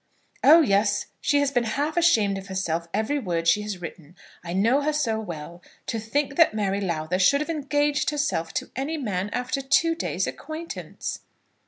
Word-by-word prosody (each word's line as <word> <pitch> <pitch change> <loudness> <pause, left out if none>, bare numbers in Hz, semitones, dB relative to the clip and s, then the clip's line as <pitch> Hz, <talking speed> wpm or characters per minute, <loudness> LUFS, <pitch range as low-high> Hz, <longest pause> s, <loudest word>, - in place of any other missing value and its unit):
"Oh, 320 +4 +8
yes; 205 -5 +2 0.2
she 285 0 +2
has 285 -1 +1
been 245 -3 +1
half 300 +2 -1
ashamed 220 - +3
of 195 - -11
herself 170 -3 -2
every 220 +9 0
word 170 -8 -2
she 185 +5 +4
has 210 -3 -5
written. 170 -1 -9 0.3
I 170 - -6
know 225 +10 +3
her 305 +1 0
so 230 -7 0
well. 170 -3 -7 0.2
To 225 - -2
think 275 +5 -2
that 330 -10 +5
Mary 200 -1 0
Lowther 170 -1 -1
should 280 +9 +4
have 300 +3 -2
engaged 290 -1 0
herself 195 - -1
to - - -3
any 280 +6 -2
man 205 -8 -2
after 250 +3 -2
two 290 +5 +3
days' 330 - -2
acquaintance!" 315 +2 -6
220 Hz, 180 wpm, -25 LUFS, 190-290 Hz, 0.3 s, Oh